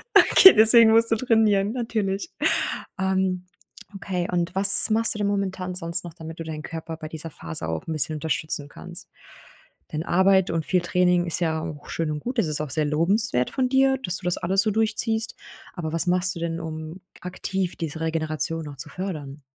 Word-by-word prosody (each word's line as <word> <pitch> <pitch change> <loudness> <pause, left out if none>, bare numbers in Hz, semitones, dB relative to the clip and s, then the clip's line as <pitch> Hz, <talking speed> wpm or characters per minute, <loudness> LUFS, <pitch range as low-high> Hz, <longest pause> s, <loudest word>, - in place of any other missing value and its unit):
Okay, 380 - +8
deswegen 225 +1 +6
musst 230 +1 +3
du - - +4
trainieren, 215 -4 +1
natürlich. 220 - -3 0.7
Ähm. 190 -1 -1 0.5
Okay, 180 -2 -4
und 175 0 -2
was 195 +3 +9
machst 225 0 +5
du - - -6
denn 205 - 0
momentan 190 -2 -3
sonst 170 0 -3
noch, 170 -2 -10
damit 160 -1 -10
du 165 - -6
deinen 155 -1 -7
Körper 165 0 -7
bei 155 -1 -8
dieser 160 +1 -8
Phase 80 - -5
auch 80 - -5
'n 160 - -3
bisschen 155 +1 +1
unterstützen 150 -1 -3
kannst? 175 +3 -10 0.8
Denn 155 +2 -3
Arbeit 190 +1 +2
und 165 -2 -2
viel 180 -2 0
Training 180 0 +1
ist 170 - -2
ja 160 -2 -1
auch 145 -2 -8
schön 160 -2 -3
und 150 - -4
gut. 245 - -4
Es 190 - 0
ist 150 -1 -2
auch 155 - -4
sehr 155 +1 -1
lobenswert 165 - 0
von 255 -1 -1
dir, 265 0 +2
dass 180 0 -2
du 185 - -9
das 180 - 0
alles 190 +3 0
so 215 - 0
durchziehst. 220 +1 -1 0.4
Aber 160 -4 -6
was 165 +2 -1
machst 180 0 +1
du - - -7
denn, 165 0 -4
um 160 +2 -8 0.2
aktiv 185 0 -4
diese 160 -1 -6
Regeneration 160 0 -2
noch 145 - -9
zu 150 +3 -7
fördern? 150 -6 -7
180 Hz, 195 wpm, -23 LUFS, 160-200 Hz, 0.8 s, was